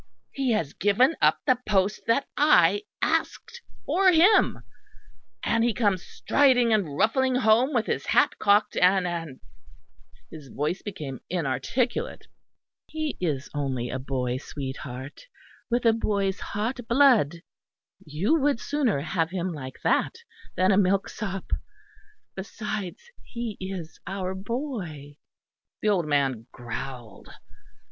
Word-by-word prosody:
He 270 -2 -1
has 165 -10 -1
given 225 - +3
up - - +4
the 255 -3 +3
post 200 0 +1
that 230 +5 +2
I 205 - +4 0.2
asked 325 +8 -1 0.2
for 380 0 +4
him; 360 +6 +4 0.8
and 230 0 +2
he 235 -3 +1
comes 205 -6 +1
striding 250 -5 +3
and 170 -10 0
ruffling 260 +4 +2
home 240 +3 +3
with 235 -5 +1
his - - -3
hat - - +3
cocked 205 +1 +3
and 185 +1 +4
and 165 -6 -4 0.5
"; - - -32
his 150 -3 -10
voice 150 +7 -3
became 150 - -6
inarticulate. 185 - -2 0.6
"He 310 -1 -3
is 145 -6 -1
only 130 -4 -2
a 130 - -3
boy, 130 -2 -2
sweetheart; 135 - -7 0.4
with 240 0 0
a 225 - +6
boy's 200 -3 -1
hot 220 +6 -3
blood 235 - +4 0.7
you 180 - 0
would 280 -4 +1
sooner 270 - 0
have 165 +1 -1
him 180 0 -3
like 130 -4 -8
that - - +1 0.4
than 185 +2 +3
a 190 - +4
milk 195 0 +2
sop. 195 -3 -6 0.8
Besides 200 - -5 0.2
he 235 -3 -5
is 185 -4 -6
our 190 -1 -3
boy." 190 - -5 0.7
The 215 - +3
old 180 -6 +1
man 135 -5 0
growled. 120 -2 -8
195 Hz, 130 wpm, -26 LUFS, 150-235 Hz, 0.8 s, a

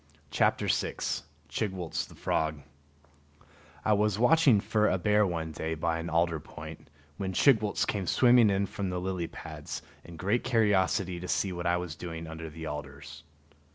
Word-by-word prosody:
[Illustration: - - 0 0.2
Chigwooltz] 95 -5 -3 1.7
I 110 - +4
was 105 -1 +2
watching 130 -1 +5
for 105 +1 +2
a 95 - +2
bear 105 +2 +3
one 80 -2 -3
day 80 +1 -3
by 80 +1 -1
an 85 +1 -4
alder 85 0 +1
point, - - -10 0.3
when 95 -1 -3
Chigwooltz 110 -2 +3
came 100 -4 -2
swimming 120 -1 +5
in 100 0 +1
from 100 0 -4
the 90 0 -2
lily 90 -2 -2
pads - - -7 0.2
in 85 -1 -11
great 100 +8 0
curiosity 95 -5 +2
to 90 - -6
see 95 0 0
what 85 0 -3
I 85 0 +3
was 90 -3 -4
doing 80 0 -6
under 80 0 -7
the 80 +1 -8
alders. 70 0 -7
90 Hz, 155 wpm, -29 LUFS, 80-105 Hz, 1.7 s, watching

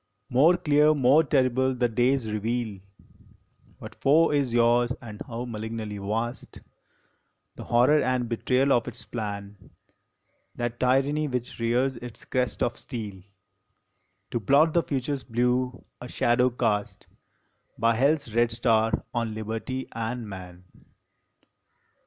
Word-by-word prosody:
More 155 +8 +5
clear, 150 -2 +3
more 140 +3 +5
terrible, 130 -2 +1
the 125 -1 +1
days 120 0 +1
reveal 110 -1 -2 1.0
What - - -10
foe 160 +4 +3
is 140 -4 +1
yours, 120 +1 +3
and 110 -4 -10
how 120 0 -5
malignly 110 -2 -5
vast 115 +5 -4 1.0
The - - -9
horror 125 +6 +4
and 125 -1 0
betrayal 130 +4 +1
of 120 0 +1
its 120 -1 -8
plan 100 -4 -6 0.9
That 120 0 -4
tyranny 135 +4 +2
which 125 -1 -4
rears 125 +3 +1
its 120 -2 -10
crest 125 -1 -1
of 120 - -1
steel 105 -7 -7 1.1
To 120 - -1
blot 145 +9 +4
the 170 - +4
Future 140 -2 -2
s 135 - -4
blue, 125 +1 -1 0.2
a 125 - -7
shadow 125 +1 +2
cast 105 -4 -2 0.7
By 115 +1 +3
Hell 135 +6 +3
s 140 -7 -6
red 120 0 +2
star 115 -1 +1
on 115 -2 -2
Liberty 115 +4 -4
and 115 0 -4
Man. 90 -2 -10
120 Hz, 130 wpm, -26 LUFS, 115-130 Hz, 1.1 s, More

